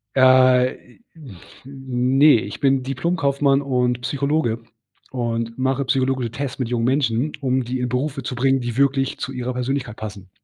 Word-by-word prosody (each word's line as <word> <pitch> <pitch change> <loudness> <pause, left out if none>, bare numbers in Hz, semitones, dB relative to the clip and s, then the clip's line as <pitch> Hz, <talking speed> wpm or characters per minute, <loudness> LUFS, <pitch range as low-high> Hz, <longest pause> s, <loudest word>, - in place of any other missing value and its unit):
Äh, 130 -1 +5 0.2
i - - -28 0.2
n 130 - -12 0.8
ne, 145 -3 +7
ich 100 - -7
bin 135 -1 +2
Diplomkaufmann 140 0 +1
und 125 -2 0
Psychologe 140 -3 -1 0.5
und 115 -2 -3
mache 130 +1 0
psychologische 130 -2 0
Tests 140 +1 -5
mit 125 -3 -2
jungen 120 -2 0
Menschen, 130 +1 +1
um 130 -1 0
die 125 +2 -4
in 125 0 -2
Berufe 135 +3 -2
zu 125 - -4
bringen, 135 +1 +2
die 120 -1 -4
wirklich 135 -1 +1
zu 130 - -5
ihrer 125 -1 -4
Persönlichkeit 125 -1 -3
passen. 105 -4 -8
130 Hz, 160 wpm, -21 LUFS, 120-135 Hz, 0.8 s, ne